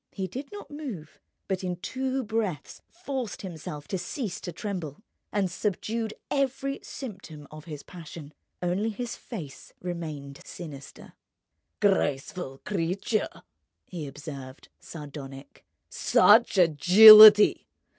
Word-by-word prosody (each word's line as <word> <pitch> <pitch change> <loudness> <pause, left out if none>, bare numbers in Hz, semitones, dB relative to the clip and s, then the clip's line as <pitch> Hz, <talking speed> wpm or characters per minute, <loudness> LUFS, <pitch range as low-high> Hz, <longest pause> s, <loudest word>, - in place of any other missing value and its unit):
He 190 - -5
did 265 - -8
not 410 -5 -10
move, 250 - -8 0.3
but 190 -1 -3
in 180 -1 -2
two 260 +7 -3
breaths 215 -7 -4
forced 275 - -6
himself 155 -5 -8
to 190 - -2
cease 195 - -5
to 175 - -6
tremble, 175 -2 -6 0.3
and 195 -3 -1
subdued 215 +3 -3 0.2
every 275 0 -1
symptom 185 - -9
of 155 0 -11
his 150 -4 -8
passion. 160 -3 -11 0.3
Only 185 +5 0
his 235 +2 -5
face 165 - -10
remained 155 -6 -7
sinister. 145 -6 -11 0.7
"Graceful 145 -6 -1
creature!" 195 +3 -2 0.4
he 165 -5 -7
observed, 140 -2 -10
sardonic. 140 -3 -11 0.2
"Such 215 0 +4
agility! 210 +6 +9
180 Hz, 110 wpm, -26 LUFS, 150-220 Hz, 0.7 s, agility